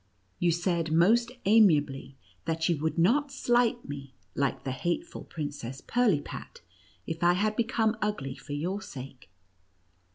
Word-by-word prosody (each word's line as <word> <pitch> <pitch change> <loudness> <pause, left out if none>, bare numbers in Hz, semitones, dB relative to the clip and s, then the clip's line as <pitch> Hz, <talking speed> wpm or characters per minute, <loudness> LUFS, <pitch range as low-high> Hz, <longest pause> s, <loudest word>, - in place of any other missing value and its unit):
You 175 - +3
said 170 -1 0
most 225 +9 +4
amiably, 150 - +4 0.3
that 165 0 0
you 170 - +2
would 160 +2 -1
not 265 - +3
slight 240 -3 +1
me, 140 -2 -8 0.2
like 140 -1 -1
the 135 - -2
hateful 175 - -3
Princess 145 -4 -6
Pirlipat, 220 - -1 0.4
if 165 +1 -4
I 175 0 +6
had 210 +4 0
become 225 -1 +1
ugly 205 -11 -2
for 145 +2 -8
your 180 +8 -2
sake. 130 - -10
170 Hz, 135 wpm, -29 LUFS, 145-220 Hz, 0.4 s, I